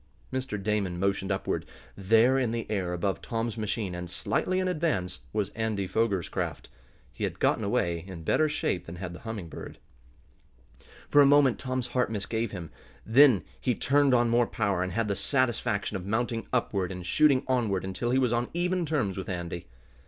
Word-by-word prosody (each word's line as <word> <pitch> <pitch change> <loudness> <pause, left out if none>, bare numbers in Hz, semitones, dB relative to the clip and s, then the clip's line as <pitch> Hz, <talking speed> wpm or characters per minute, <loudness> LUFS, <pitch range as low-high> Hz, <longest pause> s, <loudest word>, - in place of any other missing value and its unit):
Mr. 130 -5 -2
Damon 100 -3 -1
motioned 100 +1 0
upward. 95 - -1 0.3
There, 115 +6 +4
in 125 -3 +1
the 115 0 -2
air 95 -4 -1
above 90 +2 -1
Tom's 115 -1 -2
machine, 105 -3 -2
and 90 0 -5
slightly 185 - -1
in 185 - 0
advance, 150 - -1
was 105 -2 -1
Andy 110 -3 -2
Foger's 100 -3 0
craft. - - -4 0.4
He - - -6
had - - -2
gotten - - +2
away 85 -1 0
in 90 -4 -8
better 155 - +2
shape 90 - -2
than 85 - -7
had 90 0 -6
the 90 - -9
Humming 110 -6 -6
Bird. - - -9 1.3
For 145 - +6
a 140 - +7
moment 140 -3 +5
Tom's 130 -2 -2
heart 125 -3 +1
misgave 110 +2 -2
him. 90 -5 -7 0.3
Then 125 -2 +6 0.2
he 125 -3 0
turned 140 -1 +3
on 120 -1 +3
more 120 0 +3
power, 100 -4 0
and 90 0 -1
had 115 +2 0
the 100 - 0
satisfaction 115 -6 0
of 95 -1 -5
mounting 115 +1 -1
upward 100 -7 0
and 90 -1 -6
shooting 140 +7 +4
onward 115 -7 +1
until 95 +6 -2
he 130 - +2
was 125 -3 +2
on 120 +1 0
even 180 0 0
terms 110 - -1
with 95 - -6
Andy. 85 -2 -4
110 Hz, 185 wpm, -28 LUFS, 95-125 Hz, 1.3 s, a